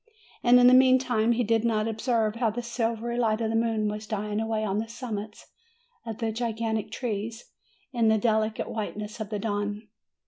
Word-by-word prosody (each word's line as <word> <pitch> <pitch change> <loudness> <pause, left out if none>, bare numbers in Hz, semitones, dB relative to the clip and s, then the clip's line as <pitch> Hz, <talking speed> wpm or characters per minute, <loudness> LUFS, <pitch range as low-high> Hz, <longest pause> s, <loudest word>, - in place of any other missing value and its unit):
And 245 0 +6
in 245 - +6
the 250 - +8
meantime 255 -3 +4
he 245 +1 +1
did 225 0 +1
not 220 -2 +1
observe 225 -1 0
how 230 -2 +2
the 240 +3 -4
silvery 235 0 -2
light 220 -2 +1
of 225 -1 -1
the - - -1
moon 225 -2 +1
was 210 +1 -4
dying 210 0 -2
away 220 -1 -1
on 205 -1 0
the 225 - -3
sum 235 0 -6
mits 210 +1 -8 0.6
of 220 -2 -4
the 225 -2 -1
gigantic 225 -1 -2
trees 225 -1 -4 0.4
in 235 -2 +2
the 220 0 +4
delicate 220 0 0
whiteness 210 0 -5
of 215 -2 -5
the 215 - -2
dawn. 205 0 -3
225 Hz, 195 wpm, -27 LUFS, 215-235 Hz, 0.6 s, the